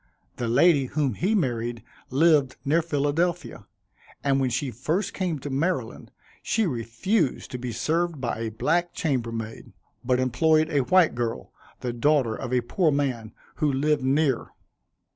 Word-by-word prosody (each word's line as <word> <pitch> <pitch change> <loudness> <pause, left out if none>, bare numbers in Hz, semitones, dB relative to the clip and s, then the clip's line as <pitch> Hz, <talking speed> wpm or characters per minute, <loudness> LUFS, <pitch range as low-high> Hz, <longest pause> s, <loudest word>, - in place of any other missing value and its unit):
The 120 - -2
lady 140 +4 +4
whom 140 -1 -1
he 190 - 0
married 120 - -1 0.3
lived 145 -2 +3
near 155 +5 +3
Philadelphia, 160 - -1 0.6
and 135 -1 +2
when 130 -1 +1
she 130 +2 -2
first 155 - -2
came 180 -5 -2
to 140 +1 -6
Maryland, 135 -3 -2 0.3
she 225 -1 +1
refused 135 - -1
to 125 - -5
be 125 0 -4
served 160 +7 -1
by 120 -3 -3
a 115 -1 -2
black 170 +10 0
chambermaid, 115 -7 -3 0.3
but 125 0 +1
employed 155 +5 +2
a 145 - +2
white 185 0 +4
girl, 120 -1 -4 0.3
the 125 -1 -3
daughter 130 -2 +2
of 125 0 -6
a 125 -1 +2
poor 160 - +1
man, 130 -6 -1 0.3
who 150 -3 +1
lived 145 +2 +1
near. 135 -1 +1
140 Hz, 150 wpm, -25 LUFS, 120-160 Hz, 0.6 s, lady